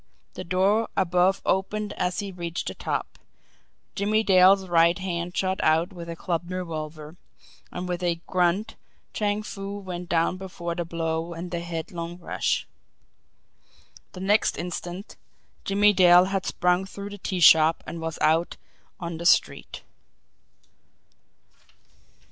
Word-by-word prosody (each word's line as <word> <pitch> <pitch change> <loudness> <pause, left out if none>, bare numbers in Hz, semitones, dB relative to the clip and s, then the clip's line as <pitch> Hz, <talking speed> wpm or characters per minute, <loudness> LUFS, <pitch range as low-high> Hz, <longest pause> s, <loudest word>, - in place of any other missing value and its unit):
The - - -6
door 195 +5 +1
above 185 +1 +2
opened 205 +2 -1
as 180 +3 -1
he 200 -1 -6
reached 175 -2 -5
the - - -6
top - - -4 0.7
Jimmie 215 +2 +1
Dale's 190 0 +5
right 170 0 +4
hand 175 -2 -4
shot 190 0 0
out 165 +5 +2
with 170 -2 -7
clubbed 175 0 -3
revolver 155 -3 -6 0.5
and 180 +1 -5
with 180 0 -3
a 170 -2 0
grunt 185 +3 0 0.4
Chang 210 0 -1
Foo 200 -1 -6
went 180 -3 -7
down 170 +2 +1
before 180 -2 -5
the 175 0 -3
blow 165 0 -3
and 175 +2 -7
the 170 - -2
headlong 170 0 -5
rush. 180 - -1 1.5
The 185 - -8
next 205 +2 +2
instant 175 +2 -6 0.5
Jimmie 205 +1 +4
Dale 180 -1 +7
had 195 -1 -2
sprung 180 +1 +1
through 200 +1 -8
the 205 - -9
tea 185 0 -3
shop 160 0 +6
and 165 - -7
was 160 0 -4
out 165 +2 +2 0.4
on 170 -2 -5
the 170 - -6
street. - - +1
180 Hz, 135 wpm, -25 LUFS, 170-195 Hz, 1.5 s, Dale